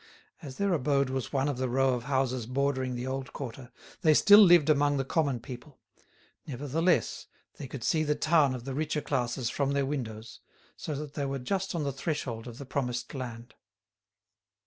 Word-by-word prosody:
As 135 -3 -9
their 200 -2 +1
abode 140 -3 +1
was 130 -3 -3
one 135 0 +1
of 140 -3 -2
the 130 -1 -1
row 135 +1 +2
of 120 -1 -4
houses 130 -3 0
bordering 130 -1 -1
the 120 +1 -4
old 130 0 -4
quarter, 125 -2 -7 0.3
they 155 -4 +5
still 205 +5 +8
lived 175 -7 +7
among 145 -1 +3
the 135 - -1
common 140 -4 0
people; 130 +3 -10 0.7
nevertheless, 145 - 0 0.3
they 140 - -6
could 130 -2 -7
see 155 +5 +2
the 150 -1 +1
town 155 -5 +3
of 125 -1 -8
the 135 - -4
richer 150 +1 -1
classes 125 -3 -1
from 140 -1 0
their 140 -1 +1
windows, 115 -5 -5 0.4
so 155 - -5
that 145 0 -6
they 140 -2 -2
were 135 0 -2
just 190 +8 -2
on 165 - -1
the 140 -1 -2
threshold 135 -5 -4
of 120 -1 -9
the 140 - -8
promised 125 -2 -3
land. 120 -3 -7
135 Hz, 190 wpm, -29 LUFS, 125-150 Hz, 0.7 s, still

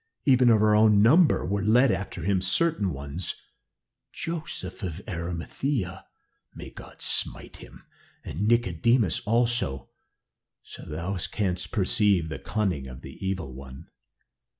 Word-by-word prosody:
Even 130 -3 +5
of 110 -2 +4
our 105 0 +4
own 105 -1 +5
number 155 +9 +5
were 100 +2 -1
led 115 +5 +4
after 95 -3 -4
him 95 0 +1
certain 100 - +1
ones 70 +5 -5 0.8
Joseph 165 -5 -5
of 90 -3 -4
Arimathea 90 - -4 0.5
may - - -9
God - - -9
smite - - 0
him, - - -14 0.4
and 100 +6 -3
Nicodemus 115 -2 +2
also, 115 - 0 0.7
so - - -11
thou 85 +6 -4 0.2
canst 90 -4 -2
perceive 100 -4 +2
the 80 - -6
cunning 95 -11 -2
of 65 -1 -10
the - - -11
Evil 95 -8 -3
One. 65 0 -11
100 Hz, 125 wpm, -26 LUFS, 85-115 Hz, 0.8 s, Even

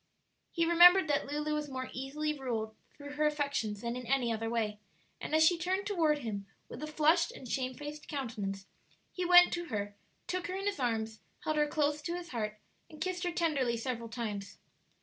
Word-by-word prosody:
He 335 -1 +1
remembered 350 +1 +8
that 280 -1 +1
Lulu 300 +1 -2
was 300 -1 -2
more 260 -1 -5
easily 300 +4 -2
ruled 225 -5 -3 0.2
through 285 -1 -8
her 300 +1 +2
affections 280 -9 -1
than 235 0 -3
in 250 -1 -6
any 250 -3 +2
other 225 0 -2
way, 215 -3 -1 0.4
and 310 - -2
as 315 0 +6
she 340 +1 +4
turned 375 +3 -1
toward 330 -7 +2
him, 200 -3 -4 0.2
with - - -9
a 305 - -4
flushed 315 +3 +3
and 255 - -10
shamefaced 275 +5 -4
countenance, 215 -9 -4 0.5
he 365 - -3
went 355 0 +8
to 345 0 -2
her, 205 -7 -3 0.3
took 365 -1 -2
her 365 - -4
in 390 +1 -4
his 410 -6 -1
arms, 225 -3 -1 0.2
held 310 0 -1
her 300 0 +3
close 295 0 0
to 340 +3 -3
his 350 -1 -6
heart, 215 -3 -3 0.3
and 310 - -13
kissed 370 -1 -2
her 350 - 0
tenderly 290 -9 +1
several 230 -1 -4
times. 205 -4 -5
290 Hz, 195 wpm, -32 LUFS, 230-330 Hz, 0.5 s, remembered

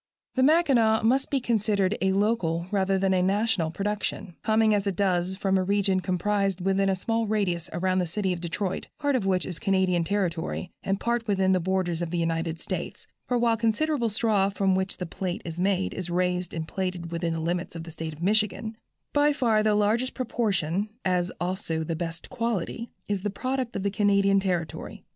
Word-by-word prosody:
The 260 - +1
Mackinaw 260 -8 +4
must 260 +4 +2
be 275 - +1
considered 215 -4 +1
a 190 0 +3
local 190 -5 +1
rather 195 -1 +2
than 190 0 +2
a 185 - +3
national 195 -3 +1
production, 200 0 -3
coming 220 0 +3
as 205 -1 +1
it 195 - 0
does 185 -1 +1
from 190 0 +1
a - - +1
region 195 0 +2
comprised 195 +1 0
within 195 +1 +2
a 190 - +2
small 225 +4 -1
radius 180 -6 0
around 185 +1 +1
the 180 - 0
city 190 +2 -1
of 175 - -6
Detroit, 180 +2 -3
part 285 -1 +1
of 215 -6 0
which 185 -1 +1
is 180 -3 -5
Canadian 190 -4 +2
territory 180 -2 -2
and 195 0 -1
part 235 -1 -1
within 190 -2 +2
the 185 - +3
borders 180 -1 -1
of 170 - -2
the 175 - -2
United 165 0 -1
States; - - -5 0.2
for 250 - +1
while 235 -1 +3
considerable 235 +3 +1
straw 210 -2 +2
from 195 -1 +1
which 190 0 0
the 180 - -4
plait 180 +1 -4
is 165 0 -5
made 190 0 +1
is 185 -2 -5
raised 180 0 0
and 160 -1 -4
plaited 180 -3 -3
within 170 0 -1
the 165 - -2
limits 175 +2 -2
of 165 - -5
the 165 - -9
State 160 0 -5
of 155 +3 -9
Michigan, 215 +2 +1 0.4
by 290 0 +4
far 230 -6 +2
the 215 -1 +3
largest 220 +5 +1
proportion, 205 - 0 0.2
as 180 -1 +1
also 175 -3 -2
the 165 +1 -2
best 165 0 -5
quality, 230 0 -2 0.2
is 205 -2 -1
the 205 - -1
product 255 +4 -3
of 195 - -2
the 200 - 0
Canadian 200 0 +3
territory. 180 -5 -3
195 Hz, 200 wpm, -26 LUFS, 180-215 Hz, 0.4 s, Mackinaw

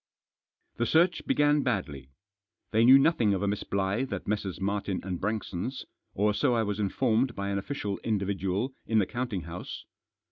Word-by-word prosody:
The 120 - 0
search 170 +2 +2
began 145 0 +3
badly. 80 - -3 0.6
They 110 +1 +3
knew 130 +3 +9
nothing 135 -9 +3
of 95 - -2
a - - +1
Miss 100 +1 -1
Blyth 100 +7 -1
at 100 - -4
Messrs. 100 -3 -2
Martin 100 -1 -1
and 90 -2 -4
Braiixon's, 110 +3 -3 0.3
or 105 +2 +2
so 125 +3 +2
I 115 - +2
was 105 -1 -3
informed 110 +5 +1
by 100 0 -3
an 100 0 0
official 100 -3 -4
individual 100 +2 -1
in 110 - +2
the 105 - +4
counting 120 -3 -3
house. 85 +2 -7
105 Hz, 170 wpm, -28 LUFS, 95-120 Hz, 0.6 s, knew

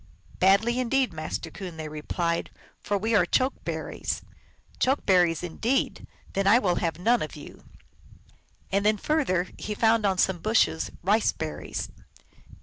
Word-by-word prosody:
"Badly 205 +6 +4
indeed, 255 -2 +1
Master 155 +1 -5
Coon," 180 -4 -8
they 155 -1 -5
replied, 170 +3 -2 0.2
" - - -31
for 205 - -1
we 220 +3 -1
are 205 -5 +5
Choke 255 +9 0
berries." - - -4 0.3
" - - -31
Choke 265 +3 +1
berries, 175 -3 +3
indeed! 225 +10 -1 0.3
Then 195 0 0
I 210 +4 +7
will 185 -7 +1
have 165 -2 -1
none 230 +7 +2
of - - -5
you." - - -12 1.1
And 200 +1 +2
then 215 0 +3
further 200 - 0
he 210 - -4
found 225 0 +3
on 190 -1 0
some 190 -1 +2
bushes, 215 -5 +2
Rice 210 +4 +3
berries. - - -5
195 Hz, 155 wpm, -26 LUFS, 175-230 Hz, 1.1 s, I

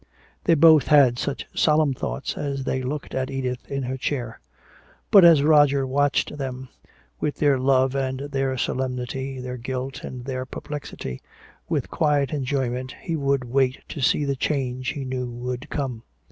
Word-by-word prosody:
They 165 - +5
both 155 -2 +6
had 135 -5 +5
such 140 - -3
solemn 150 -2 +3
thoughts 135 +1 -4
as 140 -2 -3
they 130 0 -1
looked 140 +3 -4
at 130 0 -1
Edith 130 -2 -4
in 140 -1 -2
her 130 +1 -3
chair. 125 -4 -3 0.7
But 200 -3 +9
as 165 -4 +7
Roger 145 -3 +5
watched 145 +2 0
them, 130 -1 -5 0.5
with 150 - -1
their 145 -3 +2
love 130 0 +3
and 130 -1 -2
their 135 -2 -2
solemnity, 130 +1 -3
their 125 0 -5
guilt 130 +2 -5
and 125 -1 -7
their 130 -1 -4
perplexity, 140 - -7 0.5
with - - -1
quiet 145 -3 +1
enjoyment 130 -2 -2
he 165 - -2
would 140 -3 0
wait 130 +1 +1
to 145 - -6
see 145 +2 +2
the 140 -1 0
change 130 -2 -2
he 140 -2 -4
knew 125 -1 -3
would 125 +1 -5
come. 130 -6 -3
135 Hz, 160 wpm, -24 LUFS, 130-145 Hz, 0.7 s, But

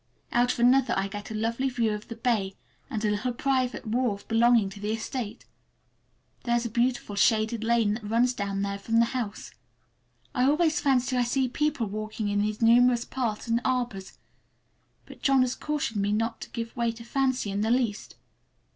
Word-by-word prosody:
Out 245 +1 +3
of - - -8
another 250 +2 +4
I 195 0 0
get 205 +1 -7
a 220 - -5
lovely 230 +5 -1
view 235 -3 0
of 210 0 -6
the 230 - -7
bay 220 -5 0 0.3
and 220 -5 -2
a 210 - +2
little 215 +5 -1
private 255 -1 -1
wharf 220 -3 -1
belonging 230 -2 +4
to 200 - -10
the 210 +1 -2
estate. 225 0 -4 1.0
There 240 -1 +1
is 240 0 0
a 235 - -3
beautiful 240 -2 0
shaded 220 +2 +2
lane 225 -2 +2
that 215 -1 -6
runs 240 +3 +3
down 200 -3 -2
there 200 0 -3
from 225 +3 0
the 230 - +5
house. 230 -5 -4 0.8
I 250 -2 +2
always 310 +3 +2
fancy 260 -2 +2
I 245 - +3
see 260 +2 +1
people 290 -1 -1
walking 215 +1 -4
in 205 0 +1
these 215 +2 -2
numerous 240 +1 +5
paths 235 -5 -3
and 230 +1 +1
arbors, 245 -7 -2 0.9
but - - -14
John 270 -2 +4
has 255 0 +1
cautioned 285 -8 -2
me 200 +1 0
not 225 +2 -1
to - - -7
give 230 -1 -6
way 235 -1 0
to 230 0 -11
fancy 260 -3 0
in 200 +1 -1
the 220 - 0
least. 235 -4 -1
230 Hz, 190 wpm, -27 LUFS, 215-250 Hz, 1.0 s, the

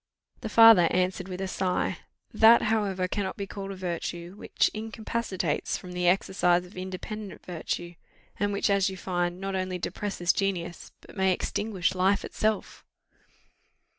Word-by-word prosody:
The 220 - -5
father 225 -6 +8
answered 185 0 0
with 185 0 -6
a 190 - -2
sigh, 185 -1 -1 0.3
"that, 225 +1 +7
however, 200 -4 0
cannot 190 0 -3
be 200 - -3
called 195 0 -7
a 195 - -5
virtue, 175 -1 -4
which - - 0
incapacitates 215 -6 -2
from 180 - -10
the 180 0 -1
exercise 180 -1 +2
of 180 - -16
independent 190 +3 -7
virtue, 175 0 -4 0.5
and 205 0 +1
which, 200 0 +1
as 200 -1 +3
you 190 - -7
find, 175 -1 -2
not 195 0 -4
only 185 -1 -2
depresses 180 0 -1
genius, 175 -3 -3
but - - -15
may 190 -1 +2
extinguish 190 -1 -1
life 190 +2 +2
itself." 215 -1 -2
190 Hz, 150 wpm, -27 LUFS, 180-205 Hz, 0.5 s, father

